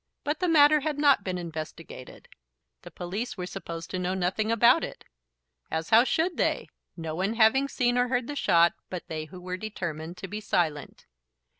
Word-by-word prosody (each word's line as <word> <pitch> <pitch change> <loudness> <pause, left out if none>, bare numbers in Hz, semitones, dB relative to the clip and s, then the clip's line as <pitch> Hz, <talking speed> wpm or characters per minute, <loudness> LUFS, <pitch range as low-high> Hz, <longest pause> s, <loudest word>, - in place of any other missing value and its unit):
But 295 +1 -2
the 365 - 0
matter 305 -2 +6
had 300 0 -2
not 285 -7 +4
been 185 -2 -3
investigated. 160 -5 -8 0.5
The - - -11
police 200 +8 -5
were 180 - -4
supposed 170 -3 -7
to 185 - -2
know 180 +1 -1
nothing 190 +4 0
about 235 +2 +5
it, - - -7 0.6
as 160 0 -3
how 230 +3 +7
should 335 +6 0
they, - - 0 0.3
no 160 -2 -5
one 190 +7 -1
having 240 +5 +4
seen 245 -3 +1
or 245 - +2
heard 245 -1 0
the 290 - -5
shot 170 -9 +4 0.2
but 180 -2 -5
they 155 -1 -4
who 180 +3 -11
were 180 0 -5
determined 175 -5 -5
to 195 - -7
be 210 +3 -6
silent? 155 -8 -2
190 Hz, 185 wpm, -27 LUFS, 170-245 Hz, 0.6 s, how